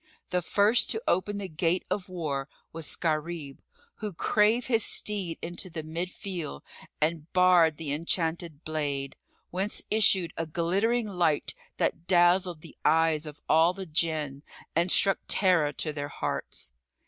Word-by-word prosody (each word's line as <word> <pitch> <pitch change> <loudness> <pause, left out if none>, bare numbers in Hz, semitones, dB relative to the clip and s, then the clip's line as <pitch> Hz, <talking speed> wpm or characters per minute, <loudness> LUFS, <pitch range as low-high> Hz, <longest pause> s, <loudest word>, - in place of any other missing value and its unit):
The 180 -1 +1
first 205 +7 +3
to 225 0 -1
open 200 +3 +1
the 200 -1 -4
gate 170 +2 0
of 190 -2 -2
war 145 -6 -3 0.2
was 160 -2 -4
Gharib, 155 -3 -3 0.4
who 210 -3 -4
drave 215 +7 +2
his 225 -4 +3
steed 195 -6 -2
into 175 +2 -4
the 160 -2 -6
mid 165 +3 -4
field 175 - -6 0.4
and 155 +1 -1
bared 180 -4 +5
the 150 -3 -3
enchanted 165 0 -2
blade, 145 -3 -3 0.4
whence 190 +4 -2
issued 190 -5 +4
a 165 - -3
glittering 200 +9 0
light 175 -6 0 0.2
that 170 +1 -1
dazzled 175 -1 +3
the 165 - -13
eyes 160 -1 +3
of 150 -1 -9
all 165 +3 +5
the 190 0 -6
Jinn 155 -4 -1 0.3
and 170 +3 +2
struck 195 +1 +5
terror 180 -7 +3
to 155 0 -2
their 145 -1 -4
hearts. 60 - -4
170 Hz, 150 wpm, -28 LUFS, 155-185 Hz, 0.4 s, bared